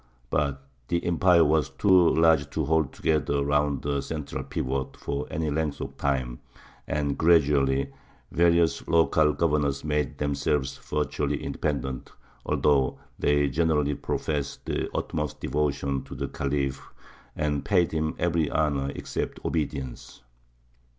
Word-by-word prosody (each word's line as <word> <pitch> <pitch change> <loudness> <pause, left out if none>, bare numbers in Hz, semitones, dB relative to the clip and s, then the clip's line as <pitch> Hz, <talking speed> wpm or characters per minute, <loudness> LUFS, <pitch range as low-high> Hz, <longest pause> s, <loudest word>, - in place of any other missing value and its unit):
But 70 -1 -1 0.2
the 85 -1 -1
empire 85 -1 +4
was 75 0 +2
too 95 -4 +4
large 80 -2 +4
to 80 - -2
hold 80 -1 +1
together 70 -2 0
round 75 -1 +1
a 70 -1 0
central 75 -1 -5
pivot 65 0 -3
for 70 +1 -4
any 80 -1 -2
length 75 -1 -1
of - - -6
time, 65 -4 -1 0.5
and 70 -2 -1
gradually 70 -5 +3 0.4
various 85 -1 +3
local 80 -2 +4
governors 75 -4 0
made 75 -3 -1
themselves 70 -1 0
virtually 75 -1 -2
independent, 65 -3 -3 0.4
although 70 -3 +2 0.2
they 75 0 +3
generally 75 0 +1
professed 70 0 -3
the - - -2
utmost - - -3
devotion 70 -2 -1
to - - -9
the - - -3
Khalif 70 -1 -2 0.5
and 75 -2 -1
paid 90 -5 +2
him 80 0 -1
every 85 -3 +1
honour 70 -3 0
except - - -4
obedience. 70 -6 -4
75 Hz, 125 wpm, -26 LUFS, 70-80 Hz, 0.5 s, empire